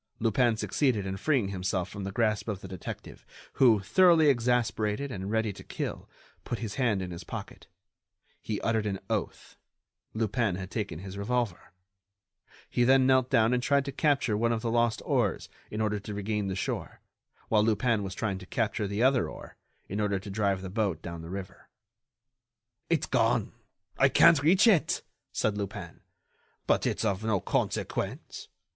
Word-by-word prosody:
Lupin 115 Hz, +1 st, +2 dB
succeeded 115 Hz, -4 st, 0 dB
in 95 Hz, 0 st, -3 dB
freeing 120 Hz, -1 st, +1 dB
himself 95 Hz, -1 st, -2 dB
from 100 Hz, 0 st, -7 dB
the 100 Hz, -, -4 dB
grasp 110 Hz, -1 st, 0 dB
of 100 Hz, -3 st, -3 dB
the -, -, -8 dB
detective, 95 Hz, -2 st, -8 dB, 0.4 s
who, 115 Hz, -6 st, +6 dB
thoroughly 160 Hz, -, +5 dB
exasperated 120 Hz, 0 st, +1 dB
and 95 Hz, -2 st, -5 dB
ready 110 Hz, -1 st, 0 dB
to -, -, -11 dB
kill, -, -, -5 dB, 0.3 s
put 120 Hz, -, -3 dB
his 110 Hz, -3 st, -5 dB
hand 110 Hz, -7 st, +1 dB
in 90 Hz, -, -6 dB
his 85 Hz, +1 st, -7 dB
pocket. -, -, -8 dB, 0.7 s
He 105 Hz, -2 st, -3 dB
uttered 110 Hz, -2 st, 0 dB
an 95 Hz, -2 st, -2 dB
oath: -, -, -3 dB, 0.6 s
Lupin 110 Hz, -2 st, 0 dB
had 95 Hz, 0 st, -7 dB
taken 100 Hz, -7 st, -3 dB
his 95 Hz, +3 st, -8 dB
revolver. 110 Hz, -4 st, -2 dB, 1.0 s
Then 130 Hz, +2 st, +5 dB
he -, -, +3 dB
knelt 130 Hz, -1 st, +3 dB
down 115 Hz, -2 st, +3 dB
and 125 Hz, -, +1 dB
tried 140 Hz, +1 st, +2 dB
to 140 Hz, -, -3 dB
capture 140 Hz, -6 st, +1 dB
one 115 Hz, +2 st, +1 dB
of 115 Hz, -1 st, -1 dB
the 115 Hz, -, 0 dB
lost 115 Hz, -1 st, +1 dB
oars -, -, 0 dB, 0.2 s
in 105 Hz, -, -3 dB
order 105 Hz, -1 st, 0 dB
to 105 Hz, +1 st, -7 dB
regain 105 Hz, 0 st, -2 dB
the 95 Hz, -, -2 dB
shore, 95 Hz, -, -4 dB, 0.5 s
while 105 Hz, -1 st, +4 dB
Lupin 115 Hz, 0 st, +2 dB
was 95 Hz, -2 st, -5 dB
trying 100 Hz, -4 st, -2 dB
to 90 Hz, -, -12 dB
capture 110 Hz, -3 st, -1 dB
the 100 Hz, +4 st, -1 dB
other 130 Hz, -1 st, +3 dB
oar -, -, -11 dB, 0.3 s
in 100 Hz, +3 st, -3 dB
order 100 Hz, -1 st, +1 dB
to 95 Hz, +1 st, -7 dB
drive 100 Hz, -2 st, 0 dB
the 95 Hz, -, -6 dB
boat 100 Hz, -6 st, -1 dB
down 85 Hz, -1 st, -6 dB
the 80 Hz, -, -9 dB
river. 95 Hz, +1 st, -8 dB, 1.2 s
"It's 165 Hz, -4 st, +1 dB
gone! 115 Hz, -1 st, +1 dB, 0.5 s
I 135 Hz, -, +6 dB
can't 165 Hz, +1 st, +6 dB
reach 185 Hz, +9 st, +5 dB
it," 200 Hz, -9 st, +3 dB, 0.3 s
said 105 Hz, -1 st, 0 dB
Lupin. 100 Hz, -4 st, -6 dB, 0.6 s
"But -, -, +2 dB
it's -, -, -1 dB
of 100 Hz, -1 st, 0 dB
no 110 Hz, -3 st, +1 dB
consequence. -, -, -3 dB
110 Hz, 175 wpm, -29 LUFS, 100-120 Hz, 1.2 s, who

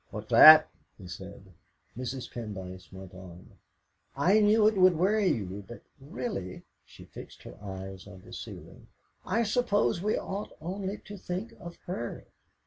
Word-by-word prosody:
"What's -, -, -8 dB
that?" 155 Hz, 0 st, +10 dB, 0.3 s
he 95 Hz, -, -12 dB
said. -, -, -10 dB, 0.4 s
Mrs. 130 Hz, +1 st, -6 dB
Pendyce 95 Hz, -5 st, -8 dB
went 95 Hz, -1 st, -11 dB
on 90 Hz, -1 st, -13 dB, 0.6 s
"I 185 Hz, +9 st, +4 dB
knew 210 Hz, 0 st, +5 dB
it 220 Hz, -, +2 dB
would 185 Hz, -3 st, +5 dB
worry 200 Hz, +4 st, +2 dB
you; 100 Hz, -, -2 dB
but 120 Hz, -, -11 dB, 0.2 s
really" 120 Hz, -9 st, -6 dB, 0.2 s
she -, -, -15 dB
fixed -, -, -12 dB
her -, -, -11 dB
eyes 95 Hz, -1 st, -8 dB
on 95 Hz, -2 st, -13 dB
the -, -, -13 dB
ceiling -, -, -10 dB, 0.4 s
"I 230 Hz, -, +1 dB
suppose 210 Hz, -5 st, +1 dB
we 210 Hz, +2 st, 0 dB
ought 200 Hz, +2 st, -6 dB
only 190 Hz, +5 st, -4 dB
to 205 Hz, -, -9 dB
think 185 Hz, +5 st, -5 dB
of 170 Hz, 0 st, -9 dB
her." 120 Hz, -10 st, -5 dB
145 Hz, 150 wpm, -29 LUFS, -, 0.6 s, that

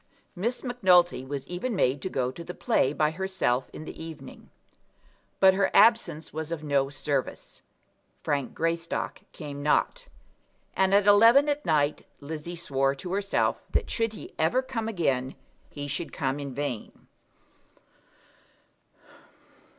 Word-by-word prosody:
Miss 230 Hz, +7 st, -2 dB
Macnulty 185 Hz, -, +3 dB
was 135 Hz, 0 st, -5 dB
even 195 Hz, +7 st, -3 dB
made 135 Hz, -5 st, +1 dB
to 185 Hz, -, -3 dB
go 125 Hz, -5 st, -1 dB
to 170 Hz, -, -9 dB
the 180 Hz, +1 st, -8 dB
play 220 Hz, -, +1 dB
by 150 Hz, +1 st, +1 dB
herself 160 Hz, -9 st, -1 dB
in 155 Hz, -, -9 dB
the 160 Hz, -, -8 dB
evening. 160 Hz, -2 st, -10 dB, 0.9 s
But 190 Hz, -1 st, +7 dB
her 195 Hz, 0 st, +2 dB
absence 210 Hz, -8 st, +4 dB
was 160 Hz, +1 st, -5 dB
of 160 Hz, -2 st, -4 dB
no 140 Hz, -2 st, +1 dB
service. 140 Hz, -1 st, -4 dB, 0.6 s
Frank 140 Hz, -3 st, -2 dB
Greystock 165 Hz, 0 st, -2 dB
came 145 Hz, -3 st, -7 dB
not; -, -, +1 dB, 0.7 s
and 190 Hz, +1 st, +3 dB
at 200 Hz, 0 st, +4 dB
eleven 230 Hz, +8 st, +7 dB
at 290 Hz, -6 st, -1 dB
night 150 Hz, -2 st, +1 dB
Lizzie 155 Hz, +4 st, -6 dB
swore 135 Hz, -5 st, 0 dB
to 180 Hz, +6 st, -6 dB
herself 200 Hz, 0 st, 0 dB
that -, -, 0 dB
should 225 Hz, -1 st, -1 dB
he -, -, -10 dB
ever 170 Hz, +12 st, +2 dB
come 240 Hz, -4 st, -4 dB
again, 135 Hz, -, -1 dB, 0.3 s
he 145 Hz, -1 st, -6 dB
should 145 Hz, +4 st, -4 dB
come 135 Hz, -1 st, -2 dB
in 140 Hz, -3 st, -6 dB
vain. 140 Hz, -6 st, -5 dB
165 Hz, 140 wpm, -27 LUFS, 140-195 Hz, 0.9 s, But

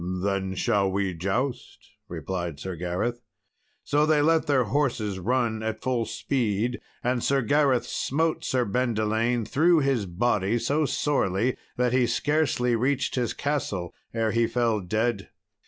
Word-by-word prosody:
"Then 95 Hz, +1 st, -2 dB
will 100 Hz, -2 st, +2 dB
we 95 Hz, -1 st, -1 dB
joust," 110 Hz, +10 st, -2 dB, 0.3 s
replied 85 Hz, -5 st, -4 dB
Sir 95 Hz, +3 st, -5 dB
Gareth. 90 Hz, +8 st, -2 dB, 0.6 s
So 150 Hz, +1 st, +2 dB
they 155 Hz, -1 st, +4 dB
let 165 Hz, +1 st, +3 dB
their 135 Hz, -3 st, +3 dB
horses 115 Hz, -6 st, -1 dB
run 115 Hz, +2 st, 0 dB
at 110 Hz, 0 st, -4 dB
full 125 Hz, -3 st, 0 dB
speed, 120 Hz, -2 st, -1 dB, 0.2 s
and 125 Hz, -1 st, 0 dB
Sir 135 Hz, -1 st, +2 dB
Gareth 135 Hz, 0 st, +2 dB
smote 160 Hz, +4 st, -1 dB
Sir 125 Hz, -2 st, +1 dB
Bendelaine 115 Hz, 0 st, 0 dB
through 160 Hz, +7 st, +3 dB
his 135 Hz, -7 st, 0 dB
body 105 Hz, +3 st, +1 dB
so 145 Hz, +6 st, +1 dB
sorely 125 Hz, -6 st, 0 dB, 0.2 s
that 125 Hz, 0 st, +1 dB
he 125 Hz, -1 st, +3 dB
scarcely 145 Hz, -5 st, +1 dB
reached 135 Hz, +3 st, 0 dB
his 125 Hz, -2 st, -1 dB
castle 110 Hz, -, -2 dB, 0.2 s
ere 115 Hz, -1 st, 0 dB
he 115 Hz, 0 st, +2 dB
fell 115 Hz, -3 st, +1 dB
dead. 110 Hz, +2 st, -1 dB
120 Hz, 140 wpm, -26 LUFS, 100-135 Hz, 0.6 s, they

